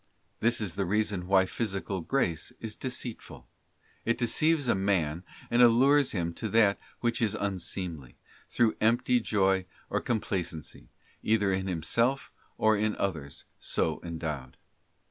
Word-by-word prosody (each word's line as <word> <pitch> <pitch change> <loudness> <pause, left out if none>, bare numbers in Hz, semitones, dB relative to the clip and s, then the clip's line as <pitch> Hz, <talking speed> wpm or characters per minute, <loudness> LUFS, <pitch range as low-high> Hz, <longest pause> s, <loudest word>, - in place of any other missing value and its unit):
This 115 +1 +2
is 105 -6 -2
the 100 - -1
reason 100 -2 0
why 95 0 +5
physical 100 -2 -3
grace 85 - -1
is 110 -2 -6
deceitful: 125 -3 -6 0.6
it 115 - +1
deceives 150 +4 +2
a - - +4
man 90 -4 0 0.3
and 120 +1 +4
allures 130 +4 +5
him 85 -4 -2
to 110 - -2
that 105 -2 +4 0.2
which 120 0 0
is 110 -2 +1
unseemly, 90 -7 -4 0.3
through 115 -2 +2
empty 120 +2 +3
joy 95 -4 +1 0.2
or - - +1
com 120 -3 0
placency, 90 -6 -5 0.3
either 105 -3 +2
in 95 0 -1
himself, 115 - 0 0.3
or 110 0 +4
in 105 +1 0
others, 80 -8 -3
so 80 -1 -1
endowed. 80 -6 -5
100 Hz, 140 wpm, -29 LUFS, 90-115 Hz, 0.6 s, why